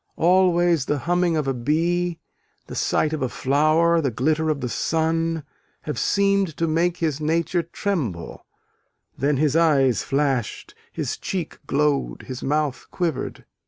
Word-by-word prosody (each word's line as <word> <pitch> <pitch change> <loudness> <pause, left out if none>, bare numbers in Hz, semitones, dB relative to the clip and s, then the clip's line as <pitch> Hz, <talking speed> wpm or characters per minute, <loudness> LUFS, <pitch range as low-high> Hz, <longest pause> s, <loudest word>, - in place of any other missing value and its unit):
Always, 175 -3 +3
the 145 - 0
humming 175 +2 +1
of 150 -3 -1
a 135 - +1
bee, 165 +7 0 0.5
the - - -9
sight 155 - 0
of 155 - -3
a 130 - 0
flower, 155 +6 +2
the 140 - 0
glitter 155 +7 0
of 150 -2 0
the 125 - -3
sun, 165 +5 0 0.4
have 150 - -4
"seemed 200 -4 +1
to 165 - 0
make 170 +2 +1
his 155 -3 -1
nature 165 +3 +1
tremble: 160 - -4 0.7
then 140 +1 +1
his 150 +1 +1
eyes 140 -8 +3
flashed, 135 -5 -1 0.2
his - - -3
cheek 185 -4 -4
glowed, 140 - 0
his 130 -1 -7
mouth 150 -2 -1
quivered." 170 -6 -3
155 Hz, 145 wpm, -23 LUFS, 140-170 Hz, 0.7 s, Always